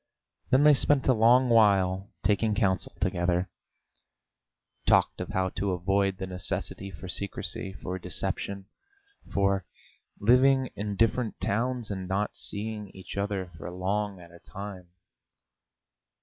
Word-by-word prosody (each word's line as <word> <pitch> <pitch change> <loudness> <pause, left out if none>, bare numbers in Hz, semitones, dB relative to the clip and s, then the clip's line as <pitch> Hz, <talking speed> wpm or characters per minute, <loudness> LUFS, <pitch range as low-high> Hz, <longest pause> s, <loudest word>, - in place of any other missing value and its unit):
Then 130 +2 +4
they 150 0 +8
spent 140 0 +2
a 130 - +6
long 120 +3 +5
while 100 -4 +3
taking 105 +2 +2
counsel 95 -4 0
together, 85 +1 0 1.4
talked - - +3
of - - -5
how 95 0 0
to 95 +1 -2
avoid 95 +2 +1
the 95 - -4
necessity 95 +1 -2
for 95 0 -9
secrecy, 100 +2 -2
for 95 0 -5
deception, 100 +2 -4 0.7
for 100 -1 +1 0.6
living 130 +3 +4
in 105 0 -3
different 115 +1 +1
towns 120 +1 0
and 95 -2 -4
not 100 +3 -1
seeing 105 0 -3
each 95 -2 -9
other 100 -2 -2
for - - -6
long 95 +2 -2
at 85 -1 -14
a 85 - -15
time. 95 -2 -9
100 Hz, 130 wpm, -28 LUFS, 95-110 Hz, 1.4 s, they